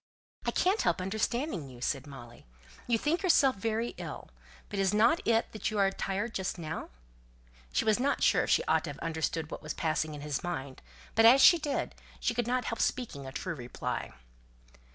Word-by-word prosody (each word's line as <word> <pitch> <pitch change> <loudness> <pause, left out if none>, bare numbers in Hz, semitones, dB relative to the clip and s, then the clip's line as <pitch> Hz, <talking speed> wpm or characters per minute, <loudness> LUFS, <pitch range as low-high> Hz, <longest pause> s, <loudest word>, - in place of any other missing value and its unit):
"I - - +4
can't 385 +4 +2
help - - +1
understanding 210 - -2
you," 125 -2 -12
said 135 +3 -2
Molly. 120 - -12 0.4
"You 235 -1 +3
think 305 +9 0
yourself 285 - +4
very 225 +3 -1
ill; - - -7 0.4
but 205 - -4
isn't 195 +2 +2 0.3
it 230 0 +2
that 215 - -2
you 215 - -3
are 195 -1 +3
tired 200 +4 -3
just 185 -1 -2
now?" 160 -2 -5 0.8
She - - +1
was 220 +1 +3
not 280 +3 +1
sure - - +4
if - - -7
she - - +4
ought 460 - +1
to - - -5
have - - -7
understood 160 -1 -2
what - - -6
was 155 - -5
passing 155 -1 -1
in 145 - -8
his 145 -2 -3
mind; 140 -6 -5 0.3
but 225 +1 +5
as 250 +4 +8
she 345 +5 +8
did, 295 -2 -2 0.3
she 240 - 0
could 240 0 -1
not 250 +1 0
help 230 - -3
speaking 180 - -2
a - - -6
true 175 +6 -4
reply. 125 -5 -4
200 Hz, 195 wpm, -30 LUFS, 155-240 Hz, 0.8 s, as